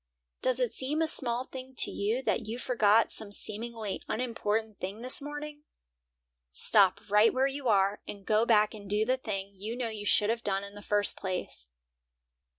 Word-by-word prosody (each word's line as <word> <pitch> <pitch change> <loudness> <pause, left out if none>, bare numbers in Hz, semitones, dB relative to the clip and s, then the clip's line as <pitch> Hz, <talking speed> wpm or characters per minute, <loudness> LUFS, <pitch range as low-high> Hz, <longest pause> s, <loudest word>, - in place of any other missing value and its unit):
Does 255 0 +1
it 250 -3 0
seem 280 +4 -3
a 325 - +1
small 245 -5 +2
thing 260 0 -10
to - - +8
you 220 +6 -2
that 230 -4 -1
you 225 +2 -4
forgot 225 -3 +2
some 215 -2 -1
seemingly 220 0 -4
unimportant 220 -3 -2
thing 200 +5 -6
this 255 +3 +1
morning? 295 +1 -7 0.9
Stop 190 - +4
right 210 +2 +5
where 260 +1 +1
you 275 -1 -3
are 200 -1 +2
and 200 -2 -9
go 215 +1 +2
back 215 -2 +3
and 205 -2 -10
do 210 +1 +1
the 255 +3 +1
thing 200 -5 -5
you 210 +4 -6
know 245 -2 -3
you 210 -2 -6
should 210 +1 +3
have 230 0 -4
done 195 -1 -1
in 200 0 -10
the 205 - -11
first 205 0 +3
place. 180 - -5
220 Hz, 185 wpm, -29 LUFS, 205-250 Hz, 0.9 s, to